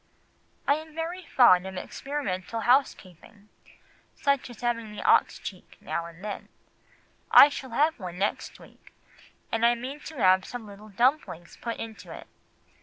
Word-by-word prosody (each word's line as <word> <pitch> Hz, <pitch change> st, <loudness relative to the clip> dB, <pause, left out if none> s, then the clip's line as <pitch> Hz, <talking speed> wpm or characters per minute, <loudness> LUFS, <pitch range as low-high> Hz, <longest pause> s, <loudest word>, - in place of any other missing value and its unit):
"I 285 Hz, -, +4 dB
am 315 Hz, 0 st, -11 dB
very 340 Hz, +3 st, -4 dB
fond 190 Hz, -, +5 dB
of 190 Hz, -1 st, -7 dB
experimental 230 Hz, -4 st, -4 dB
housekeeping, 210 Hz, -, -1 dB, 0.7 s
such 280 Hz, -3 st, 0 dB
as 240 Hz, -, -12 dB
having 230 Hz, -3 st, -2 dB
an -, -, -5 dB
ox -, -, +4 dB
cheek -, -, -10 dB
now 170 Hz, 0 st, -4 dB
and 170 Hz, +2 st, -14 dB
then; 210 Hz, -, -6 dB, 0.8 s
I 285 Hz, -, +9 dB
shall 265 Hz, -2 st, -7 dB
have 295 Hz, +5 st, +1 dB
one 180 Hz, -2 st, -7 dB
next 200 Hz, +2 st, -2 dB
week, -, -, -19 dB, 0.6 s
and 225 Hz, 0 st, -1 dB
I 235 Hz, +1 st, +5 dB
mean 260 Hz, +5 st, -7 dB
to 305 Hz, 0 st, -10 dB
have 185 Hz, -4 st, +4 dB
some 245 Hz, +1 st, -8 dB
little 205 Hz, +1 st, -12 dB
dumplings 225 Hz, -, 0 dB
put 230 Hz, -1 st, -4 dB
into 225 Hz, -1 st, -8 dB
it." -, -, -9 dB
230 Hz, 155 wpm, -27 LUFS, 190-275 Hz, 0.8 s, I